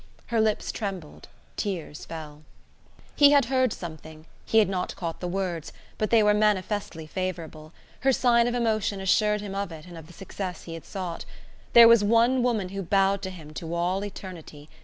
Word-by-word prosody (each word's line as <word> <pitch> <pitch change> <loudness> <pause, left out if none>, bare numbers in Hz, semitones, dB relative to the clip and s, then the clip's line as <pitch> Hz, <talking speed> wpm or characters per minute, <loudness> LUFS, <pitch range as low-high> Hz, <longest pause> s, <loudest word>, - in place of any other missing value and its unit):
Her 225 - +3
lips 215 -1 0
trembled, 190 -7 -6 0.3
tears 175 -7 -4
fell. 155 -2 -9 0.7
He 290 0 +7
had 280 -3 +5
heard 255 -2 +3
something; 160 -3 -9 0.2
he 225 - +2
had 220 - +6
not 185 -1 -3
caught 165 -3 -5
the 180 - -4
words, 175 -3 -3 0.3
but 215 - 0
they 225 -2 +5
were 210 0 +4
manifestly 205 -5 0
favourable; 160 -3 -5 0.3
her 270 - +3
sign 240 -2 +3
of 240 - -1
emotion 215 -4 0
assured 210 +2 +2
him 205 -2 -6
of 200 -2 -3
it 160 -1 -10
and 175 -2 -10
of 160 - -13
the 175 - -14
success 185 0 -6
he 165 - -8
had 165 - -9
sought. 180 -4 -5 0.5
There 235 -1 +10
was 230 -2 +6
one 230 +4 +3
woman 225 -7 0
who 195 +1 -5
bowed 195 +1 +2
to 190 - -4
him 160 -5 -11
to 165 +2 -5
all 180 +3 0
eternity! 170 -7 -9
195 Hz, 185 wpm, -26 LUFS, 165-215 Hz, 0.7 s, There